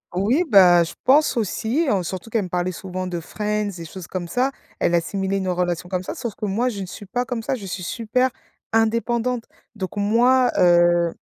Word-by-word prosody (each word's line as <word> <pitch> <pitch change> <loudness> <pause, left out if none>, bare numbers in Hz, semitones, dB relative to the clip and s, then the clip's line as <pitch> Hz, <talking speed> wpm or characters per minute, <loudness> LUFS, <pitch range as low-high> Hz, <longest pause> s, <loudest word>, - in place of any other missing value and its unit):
Oui, 235 - +2
bah, 180 - +7
je - - -8
pense 290 +2 +4
aussi, 235 - 0
hein, 195 -3 +2
surtout 185 +5 -6
qu'elle 225 -2 0
me - - -5
parlait 180 +1 -1
souvent 185 +1 -5
de 175 -1 -3
Friends, 210 +4 -2
des 170 - -7
choses 175 0 -9
comme 175 -2 -5
ça, 255 +8 +1 0.3
elle 175 - +2
assimilait 195 +3 -1
une 190 -1 -2
relation 180 -1 -1
comme 185 -1 -1
ça - - -5
sauf 235 -4 -4
que - - -4
moi 225 +6 0
je 205 - -6
ne 190 - -4
suis 200 +3 -9
pas 245 +5 -2
comme 240 -2 -4
ça, 260 - -1
je 210 - -8
suis 185 -1 -5
super 240 +6 0 0.4
indépendante. 230 +2 +1 0.3
Donc 190 0 -5
moi, 245 +5 +4
heu 175 -1 +4
200 Hz, 210 wpm, -22 LUFS, 180-235 Hz, 0.4 s, bah